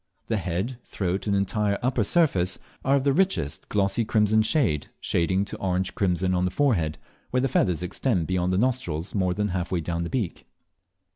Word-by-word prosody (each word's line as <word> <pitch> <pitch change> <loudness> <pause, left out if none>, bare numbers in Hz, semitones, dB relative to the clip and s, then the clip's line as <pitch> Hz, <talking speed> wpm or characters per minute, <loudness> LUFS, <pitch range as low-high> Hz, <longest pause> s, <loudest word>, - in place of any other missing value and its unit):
The 110 - +1
head, 95 +7 -3
throat, 95 +1 -3
and 100 - +2
entire 100 +1 +1
upper 125 -3 +2
surface 95 - +2 0.3
are 135 +1 +3
of 135 - +1
the 140 -1 +3
richest 185 - 0
glossy 100 +2 +1
crimson 110 0 +3
red, 90 - +1
shading 95 +3 +1
to 100 - -7
orange 95 -1 -1
crimson 95 -1 +1
on 90 0 +1
the - - +1
forehead, 90 - +1 0.3
where 125 - +1
the 135 - +2
feathers 90 - +1
extend 90 0 0
beyond 90 0 0
the 90 - +1
nostrils 100 -8 -1
more 90 -3 +1
than 105 +1 0
half 90 -1 -3
way 90 - +1
down 85 +1 -2
the 85 - -3
beak. 115 -9 -3
95 Hz, 190 wpm, -25 LUFS, 90-115 Hz, 0.3 s, are